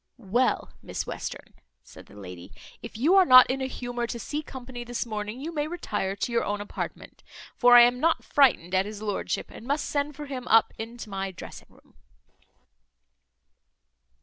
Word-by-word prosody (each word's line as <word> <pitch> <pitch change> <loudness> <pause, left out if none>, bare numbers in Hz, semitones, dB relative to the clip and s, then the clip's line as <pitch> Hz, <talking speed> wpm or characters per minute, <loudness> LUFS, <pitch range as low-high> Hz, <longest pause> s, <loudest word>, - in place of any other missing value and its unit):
"Well, 240 +3 0
Miss - - -5
Western," - - -7 0.3
said - - -15
the - - -17
lady, 90 -2 -10 0.3
"if 230 - -9
you 295 +10 +3
are 385 -1 +7
not 255 -6 +8
in 270 +1 -3
a 265 - -1
humour 245 -2 -4
to 235 - -5
see 290 +7 -4
company 255 -4 -9
this 240 0 -4
morning, 215 +1 -5
you 320 +5 -6
may 295 -1 -1
retire 205 - -3
to 200 - -3
your 235 - +1
own 205 0 -2
apartment; 205 - -7 0.3
for 245 -1 +6
I 240 - +11
am 245 +1 +4
not 330 +4 +1
frightened 240 - +3
at 190 +1 +2
his 210 0 -8
lordship, 205 -2 -3
and 235 - -11
must 285 +2 0
send 290 0 -2
for 295 +1 -7
him 260 -3 -6
up 225 0 +4
into 225 -1 -7
my 195 0 -3
dressing 185 - -11
room." - - -24
240 Hz, 180 wpm, -26 LUFS, 210-270 Hz, 0.3 s, I